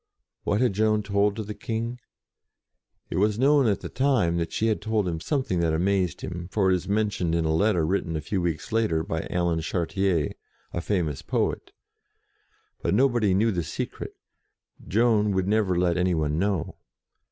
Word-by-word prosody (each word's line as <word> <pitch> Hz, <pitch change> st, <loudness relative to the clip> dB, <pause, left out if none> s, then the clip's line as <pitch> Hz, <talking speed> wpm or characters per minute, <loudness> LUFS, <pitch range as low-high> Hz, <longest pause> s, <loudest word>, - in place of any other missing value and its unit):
What 105 Hz, +3 st, +1 dB
had 125 Hz, -5 st, +2 dB
Joan 105 Hz, +1 st, +2 dB
told 100 Hz, 0 st, +1 dB
to 110 Hz, -, -4 dB
the 105 Hz, +1 st, -6 dB
King? 115 Hz, +3 st, -4 dB, 1.1 s
It -, -, -2 dB
was 105 Hz, +2 st, +2 dB
known 140 Hz, +1 st, +4 dB
at 100 Hz, -, +1 dB
the -, -, -5 dB
time 125 Hz, -11 st, +1 dB
that 85 Hz, -1 st, -2 dB
she 110 Hz, -, -1 dB
had 110 Hz, -2 st, +1 dB
told 110 Hz, -2 st, 0 dB
him 85 Hz, -2 st, -2 dB
something 130 Hz, -, -1 dB
that 85 Hz, -2 st, +1 dB
amazed 95 Hz, 0 st, 0 dB
him, 85 Hz, -2 st, -5 dB
for 95 Hz, -3 st, +2 dB
it -, -, +4 dB
is 90 Hz, -, -4 dB
men 105 Hz, +1 st, +1 dB
tioned 85 Hz, -4 st, -1 dB
in 85 Hz, -1 st, +1 dB
a 80 Hz, -, +1 dB
letter 90 Hz, -1 st, +2 dB
written 85 Hz, -1 st, -1 dB
a 80 Hz, -, -2 dB
few 95 Hz, +2 st, -2 dB
weeks 85 Hz, +1 st, -3 dB
later 110 Hz, -8 st, +1 dB
by 80 Hz, 0 st, -3 dB
Alan 85 Hz, -2 st, 0 dB
Chartier, 90 Hz, -1 st, 0 dB, 0.4 s
a 85 Hz, -, -2 dB
famous 85 Hz, -7 st, -1 dB
poet. -, -, -2 dB, 1.1 s
But -, -, +1 dB
no 130 Hz, +5 st, +5 dB
body 110 Hz, -7 st, +1 dB
knew 110 Hz, +4 st, +3 dB
the 90 Hz, -4 st, -1 dB
secret: 80 Hz, -, -5 dB, 0.7 s
Joan 105 Hz, +1 st, +3 dB
would 95 Hz, -1 st, 0 dB
never 100 Hz, -4 st, +2 dB
let 90 Hz, -1 st, +2 dB
any 90 Hz, 0 st, +2 dB
one 75 Hz, 0 st, 0 dB
know. 100 Hz, -3 st, -1 dB
95 Hz, 185 wpm, -26 LUFS, 85-110 Hz, 1.1 s, no